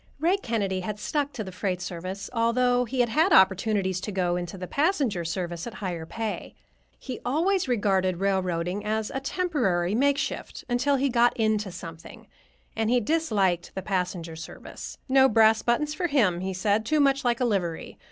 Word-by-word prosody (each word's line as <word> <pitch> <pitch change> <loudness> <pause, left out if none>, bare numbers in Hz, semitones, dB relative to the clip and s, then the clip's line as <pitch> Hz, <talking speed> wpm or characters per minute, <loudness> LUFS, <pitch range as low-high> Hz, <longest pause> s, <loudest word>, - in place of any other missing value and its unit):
Ray 345 +6 +3
Kennedy 205 - -1
had 210 +3 -4
stuck 285 +6 -1
to 220 - -4
the 190 - -8
freight 180 0 -2
service, 185 +2 -5
although 245 +1 +2
he 250 +2 0
had 240 - +1
had 315 - +3
opportunities 190 -1 +3
to 210 - -4
go 180 -2 0
into 175 +1 -4
the 180 - -5
passenger 280 - 0
service 175 +2 -4
at 235 - -8
higher 175 -7 -4
pay. 225 +1 -5 0.4
He 255 -4 -7
always 340 +8 +1
regarded 195 -6 +1
railroading 185 -1 -1
as 220 0 -1
a 270 - -1
temporary 250 - 0
makeshift, 280 +4 -1
until 255 +3 +2
he 275 +1 +1
"got 240 -1 +3
into 215 -3 +1
something," 165 -2 -10 0.5
and 225 -1 0
he 250 +1 +4
disliked 210 - 0
the 190 - -4
passenger 180 -4 -2
service. 160 0 -9
No 265 0 +5
brass 220 0 +5
buttons 295 +6 0
for 350 +3 -1
him, 220 - +2
he 190 +1 -3
said; 205 +3 +1
too 310 +5 +1
much 275 -1 +3
like 240 -2 +1
a 250 - +2
livery. 180 -7 -2
215 Hz, 175 wpm, -26 LUFS, 185-255 Hz, 0.5 s, No